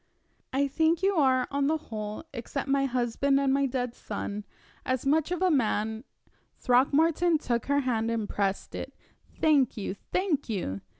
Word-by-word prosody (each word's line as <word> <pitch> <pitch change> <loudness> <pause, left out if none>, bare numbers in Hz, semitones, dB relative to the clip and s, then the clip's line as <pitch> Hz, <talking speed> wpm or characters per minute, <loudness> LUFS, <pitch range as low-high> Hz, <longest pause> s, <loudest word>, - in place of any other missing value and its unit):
"I 280 +2 +1
think 320 +5 +1
you 395 +1 +3
are, 260 -6 +3
on 280 0 +1
the 315 +2 +2
whole, 215 -6 -6
except 265 +3 -4
my 275 0 +2
husband 255 +2 +1
and 275 -1 +2
my 275 0 +2
dead 250 -2 -2
son, 205 -2 -5 0.4
as 255 0 -1
much 305 +3 +2
of 360 +1 -1
a 370 - +4
man 220 -3 0 0.3
" - - -41
Throckmorton 315 +7 +3
took 235 -5 -2
her 285 0 +2
hand 230 -4 0
and 225 -2 -1
pressed 195 -1 -2
it. - - -6 0.4
"Thank 290 -7 +3
you! 195 -2 -3
thank 305 - -2
you!" 170 - -3
265 Hz, 170 wpm, -28 LUFS, 230-295 Hz, 0.4 s, a